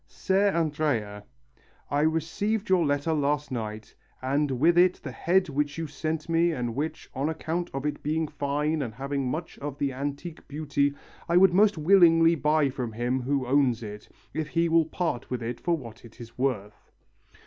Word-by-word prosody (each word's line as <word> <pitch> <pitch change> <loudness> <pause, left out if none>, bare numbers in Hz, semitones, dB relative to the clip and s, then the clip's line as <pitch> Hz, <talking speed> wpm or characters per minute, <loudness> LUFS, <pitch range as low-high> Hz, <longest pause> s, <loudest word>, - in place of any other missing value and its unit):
"Ser 195 +1 +1
Andrea, 145 - -1 0.7
I 145 - +1
received 165 +8 0
your 185 -2 +4
letter 145 +2 0
last 150 -1 0
night, 110 -3 -5 0.3
and 140 +3 0
with 150 +7 +3
it 180 +1 +5
the 135 - -5
head 180 +10 +1
which 145 0 -2
you 165 - -2
sent 155 +1 -4
me 165 +1 +2
and 120 -4 -3
which, 155 +5 -4
on 140 +4 -1
account 165 +2 -3
of 135 +1 -4
its 150 - -2
being 155 +1 -1
fine 150 +2 -1
and 115 -5 -4
having 135 0 -2
much 165 +5 -5
of 145 -1 -5
the 140 -2 -1
antique 145 +5 -5
beauty, 145 -1 0 0.3
I 170 - +4
would 185 -1 +6
most 205 0 +4
willingly 165 -1 +6
buy 150 -2 +2
from 125 -4 -4
him 120 +3 -1
who 135 +1 -1
owns 125 -3 +2
it, 105 0 -9 0.2
if 155 -1 -2
he 165 +4 +1
will 165 -1 +4
part 160 -6 -3
with 125 -2 -3
it 120 +1 -4
for 170 -1 0
what 115 -5 -11
it 115 +1 -15
is 115 -1 -11
worth." 115 -6 -3
145 Hz, 180 wpm, -27 LUFS, 130-165 Hz, 0.7 s, would